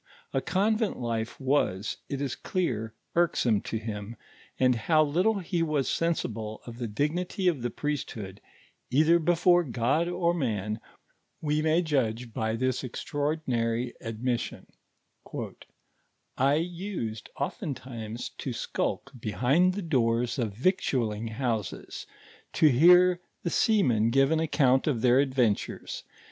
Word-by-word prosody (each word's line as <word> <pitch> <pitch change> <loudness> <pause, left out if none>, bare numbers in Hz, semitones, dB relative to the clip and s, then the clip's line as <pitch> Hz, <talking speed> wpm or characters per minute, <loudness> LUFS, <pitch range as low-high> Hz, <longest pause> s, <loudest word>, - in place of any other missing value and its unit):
A - - +1
convent 215 +3 +1
life 115 -2 -3
was, 130 -8 0
it 140 0 -3
is 140 -3 -2
dear, 115 - -2 0.2
irksome 125 -11 +2
to 115 - -3
him, 110 0 -5 0.4
and 130 -1 +5
how 155 +7 +3
little 180 +9 +2
he 175 -2 -2
wns 155 -4 +1
sensible 115 -10 -1
of 120 0 -9
the 120 - -2
dignity 170 - -1
of 160 -8 +2
the 120 - -1
priesthood, 110 -9 -4 0.5
either 155 +6 +4
before 175 +1 +4
God 135 +5 +1
or 175 -1 +1
man, 110 - -2 0.6
we 150 0 0
may 160 +3 +3
judge 125 -6 -1
by 110 +1 -1
this 130 +2 -1
extraordinary 125 -3 -1
admission: 115 +2 -3 1.7
"I 135 +2 +3
used 165 - -4
oftentimes 125 - -4
to 130 - -3
skulk 140 - -2
behind 130 - +2
the 205 - -3
doors 120 -5 +1
of 110 -5 -2
victualling 120 - 0
houses, 110 -4 -3 0.5
to 155 - +5
hear 175 +6 +6 0.2
the 170 - -1
sea 215 +2 +3
men 115 -4 +3
give 135 +4 +3
an 160 - +3
account 135 -4 +3
of 125 -7 +1
their 125 +1 +5
adventures. 130 -6 0
130 Hz, 130 wpm, -28 LUFS, 115-165 Hz, 1.7 s, hear